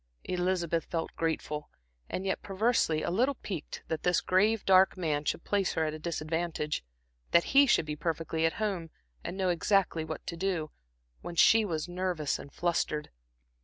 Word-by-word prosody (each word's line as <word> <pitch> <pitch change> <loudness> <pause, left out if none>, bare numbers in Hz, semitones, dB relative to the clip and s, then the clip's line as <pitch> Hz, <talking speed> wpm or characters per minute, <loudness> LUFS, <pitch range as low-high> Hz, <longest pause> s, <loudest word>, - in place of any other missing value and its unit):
Elizabeth 180 -2 0
felt 165 -1 -3
grateful, 155 -2 -2 0.4
and 190 - -3
yet 190 - -1
perversely 195 -6 +1
a - - -1
little 255 +9 +2
piqued 185 -10 -6
that 160 -1 -2
this 180 -1 +3
grave, 210 +4 +2
dark 190 0 +5
man 155 -5 -1
should 160 - -2
place 200 -2 0
her 160 - +1
at 155 - -2
a 155 - -6
disadvantage, 155 - -2 0.5
that 170 - +5
he 280 +1 +7
should 200 - +3
be 150 -1 -3
perfectly 160 +1 -2
at 165 - +3
home 195 -7 -2 0.3
and 185 - -5
know 190 -2 +1
exactly 180 -1 +2
what 160 -1 -6
to 170 - -4
do, 170 -3 -2 0.5
when 170 - -7
she 225 +6 +6
was 165 -5 -2
nervous 175 -4 -1
and 140 - -10
flustered. 165 -3 -1
170 Hz, 170 wpm, -30 LUFS, 160-190 Hz, 0.5 s, he